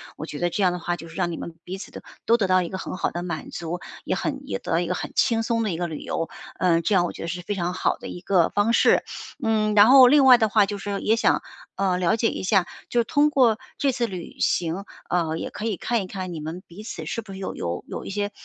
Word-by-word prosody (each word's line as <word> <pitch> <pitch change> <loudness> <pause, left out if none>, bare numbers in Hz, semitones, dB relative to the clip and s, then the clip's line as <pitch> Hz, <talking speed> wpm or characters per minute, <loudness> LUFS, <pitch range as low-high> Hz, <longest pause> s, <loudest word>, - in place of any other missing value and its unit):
我 155 - -6
觉 150 -2 -7
得 175 0 +1
这 200 - -1
样 180 - +4
的 180 - -4
话 175 +1 -2
就 165 - -10
是 165 - -13
让 175 -2 0
你 165 - -5
们 170 - -7
彼 185 +2 -6
此 195 - -9
的， - - -9 0.2
都 230 - +5
得 200 -5 +1
到 185 0 +3
一 - - -4
个 190 - -4
很 185 - -5
好 - - -1
的 175 - -4
满 170 -3 -5
足， 170 +1 -4 0.3
也 - - 0
很 - - -3
也 95 - -2
得 - - -7
到 165 - +3
一 175 - -1
个 180 - -1
很 - - -5
轻 230 -3 +2
松 230 0 0
的 215 - 0
一 165 - -3
个 175 0 -1
旅 155 -2 -6
游。 165 - -3 0.3
嗯， 170 -1 +3
这 190 +4 +1
样 175 - +4
我 - - -3
觉 - - -9
得 - - -4
是 180 +1 -4
非 205 - -2
常 180 -2 -2
好 - - +1
的 - - -9
一 - - -7
个 185 -3 +3
方 210 +3 +1
式。 - - +4 0.4
嗯， 215 -2 +1
然 205 0 +9
后 260 -1 +9
另 280 +1 +6
外 255 -2 +9
的 220 -2 +2
话 210 -1 +4
就 205 0 -5
是 200 0 -3
也 220 - +3
想， 230 - +2 0.3
呃， 185 -2 +1
了 175 +2 +2
解 225 0 +1
一 - - -5
下， 190 -1 +3 0.2
就 240 - +1
是 - - +4
通 290 +5 +3
过 245 -7 +3 0.2
这 275 - +2
次 245 -2 -1
旅 185 -5 -8
行， 175 +3 0 0.3
啊， 165 -2 0
也 - - -5
可 215 - -6
以 215 -5 -1
看 235 +4 0
一 190 - -6
看 185 -2 -5
你 160 - -5
们 160 +4 -6
彼 175 +5 -12
此 190 -7 -7
是 230 - -3
不 200 - -12
是 190 - -7
有 190 - -4
有 85 0 -4
有 - - -6
一 - - -7
些， 205 +1 -2
190 Hz, 320 characters per minute, -24 LUFS, 175-220 Hz, 0.4 s, 然